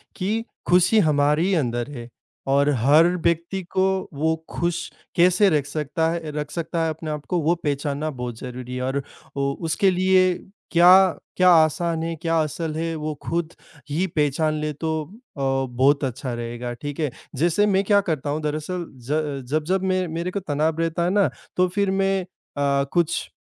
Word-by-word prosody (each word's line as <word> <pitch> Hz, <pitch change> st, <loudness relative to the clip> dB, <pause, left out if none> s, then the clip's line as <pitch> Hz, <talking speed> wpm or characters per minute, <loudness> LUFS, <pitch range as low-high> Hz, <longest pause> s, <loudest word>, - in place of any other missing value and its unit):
कि 215 Hz, +5 st, -2 dB, 0.2 s
खुशी 180 Hz, +5 st, +5 dB
हमारी 150 Hz, +3 st, +2 dB
अंदर 120 Hz, -4 st, -1 dB
है 120 Hz, -4 st, -8 dB, 0.4 s
और 140 Hz, +1 st, +3 dB
हर 145 Hz, +8 st, +5 dB, 0.2 s
व्यक्ति 170 Hz, +3 st, 0 dB
को 190 Hz, 0 st, +2 dB, 0.3 s
वो 160 Hz, +3 st, +1 dB
खुश 170 Hz, 0 st, -2 dB, 0.3 s
कैसे 180 Hz, +3 st, +5 dB
रख 150 Hz, -4 st, +1 dB
सकता 155 Hz, +2 st, -1 dB
है 170 Hz, -, -2 dB
अ, 160 Hz, -2 st, -7 dB
रख 150 Hz, 0 st, -5 dB
सकता 170 Hz, 0 st, -2 dB
है 165 Hz, -, +1 dB
अपने 155 Hz, 0 st, -5 dB
आप 150 Hz, -1 st, -5 dB
को, 180 Hz, -, 0 dB
वो 165 Hz, +2 st, +2 dB
पहचानना 145 Hz, +1 st, -1 dB
बहुत 125 Hz, -5 st, -6 dB
ज़रूरी 125 Hz, 0 st, -7 dB
है 125 Hz, -, -3 dB
और 135 Hz, +2 st, -1 dB, 0.3 s
उ 140 Hz, 0 st, 0 dB
उसके 190 Hz, +5 st, +2 dB
लिए 185 Hz, 0 st, +3 dB, 0.4 s
क्या 180 Hz, +2 st, +6 dB, 0.2 s
क्या 185 Hz, 0 st, +6 dB
आसान 165 Hz, 0 st, +3 dB
है, 165 Hz, 0 st, -3 dB
क्या 165 Hz, 0 st, -1 dB
असल 155 Hz, +1 st, -4 dB
है, 165 Hz, +1 st, -2 dB
वो 155 Hz, 0 st, -3 dB
खुद 170 Hz, +1 st, -2 dB, 0.4 s
ही 160 Hz, +6 st, 0 dB
पहचान 150 Hz, +1 st, +1 dB
ले 150 Hz, -, -1 dB
तो 160 Hz, +1 st, -2 dB, 0.3 s
अ, -, -, -8 dB
बहुत 135 Hz, +1 st, +1 dB
अच्छा 130 Hz, 0 st, -3 dB
रहेगा। 120 Hz, +1 st, -5 dB
ठीक 145 Hz, +4 st, -7 dB
है? 150 Hz, -5 st, 0 dB, 0.2 s
जैसे 170 Hz, +8 st, +2 dB
मैं 195 Hz, -1 st, +2 dB
क्या 200 Hz, 0 st, +4 dB
करता 155 Hz, -7 st, -2 dB
हूँ 150 Hz, +2 st, -1 dB
दरअसल 155 Hz, +4 st, -3 dB, 0.2 s
ज 145 Hz, -2 st, -1 dB
जब-जब 155 Hz, +6 st, 0 dB
मे 185 Hz, -1 st, +1 dB
मेरे 170 Hz, +3 st, -3 dB
को 200 Hz, -, -2 dB
तनाव 155 Hz, -2 st, -1 dB
रहता 165 Hz, +1 st, 0 dB
है 175 Hz, -, +1 dB
ना, 200 Hz, 0 st, +3 dB, 0.3 s
तो 185 Hz, 0 st, +3 dB
फिर 200 Hz, +2 st, 0 dB
मैं 195 Hz, 0 st, +1 dB
अ, -, -, -8 dB, 0.7 s
कुछ 170 Hz, -1 st, +1 dB
160 Hz, 180 wpm, -23 LUFS, 145-180 Hz, 0.7 s, क्या